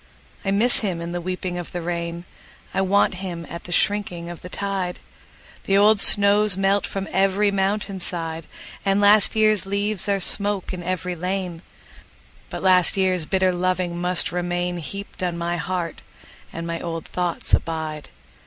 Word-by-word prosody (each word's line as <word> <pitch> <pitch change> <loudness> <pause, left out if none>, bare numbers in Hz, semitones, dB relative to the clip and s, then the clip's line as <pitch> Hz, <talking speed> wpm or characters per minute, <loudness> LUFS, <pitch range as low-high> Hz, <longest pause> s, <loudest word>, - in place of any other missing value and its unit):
I 195 - -2
miss 215 +5 +3
him 190 -6 -2
in 170 0 -5
the 175 0 -3
weeping 180 0 -4
of 175 - -8
the 175 - -3
rain;I 170 +2 -6
want 195 +1 +3
him 175 -3 -5
at 170 - -8
the 175 - -8
shrinking 175 -2 0
of 175 - -10
the 180 - -9
tide; 195 -2 -3 0.7
The 195 - +3
old 210 0 +5
snows 205 -1 +6
melt 195 +1 +2
from 195 0 -4
every 195 +2 +2
mountain 195 0 -1
side, 165 -2 -4 0.4
And 195 0 +2
last 205 +1 +5
year's 215 -3 +2
leaves 200 0 -1
are 200 -1 +2
smoke 200 0 +2
in 180 - -5
every 180 0 -3
lane; 180 -1 -3 0.9
But - - -6
last 185 -1 +4
year's 185 -4 +1
bitter 190 -1 +2
loving 180 -1 -1
must 180 0 +2
remainHeaped 175 +2 -4
on 175 -2 -2
my 170 0 -2
heart, 175 -1 -3 0.5
and 165 - -6
my 170 0 -3
old 165 -2 -5
thoughts 175 -2 -2
abide! 160 -2 -1
185 Hz, 160 wpm, -22 LUFS, 175-200 Hz, 0.9 s, snows